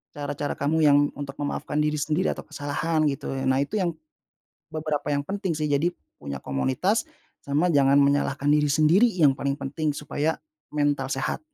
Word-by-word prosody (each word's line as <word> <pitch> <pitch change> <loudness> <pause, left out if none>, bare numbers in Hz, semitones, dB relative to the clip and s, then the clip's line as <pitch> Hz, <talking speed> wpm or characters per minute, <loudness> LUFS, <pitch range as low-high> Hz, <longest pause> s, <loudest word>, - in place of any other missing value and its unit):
cara-cara 145 0 -3
kamu 150 +3 0
yang 145 -1 +6 0.2
untuk 140 -1 -7
memaafkan 145 +1 -3
diri 150 0 +1
sendiri 155 +5 0
atau - - -8
kesalahan 155 +1 -1
gitu 140 0 -3
ya 135 0 -3
nah 130 +1 +3
itu 215 +9 -4
yang 175 -3 0 0.8
beberapa 155 -2 -3
yang 140 0 0
penting 195 -3 -2
sih. 155 - 0
Jadi 145 +5 +2 0.3
punya 70 -2 -6
komunitas, 130 - 0 0.4
sama 150 +5 +1
jangan 140 -2 +4
menyalahkan 140 0 +1
diri 150 0 +4
sendiri 155 +10 +5
yang 150 -6 +5
paling 140 0 0
penting, 150 +2 -2
supaya 150 +2 -2 0.3
mental 145 -2 0
sehat 135 0 -2
145 Hz, 165 wpm, -25 LUFS, 140-155 Hz, 0.8 s, yang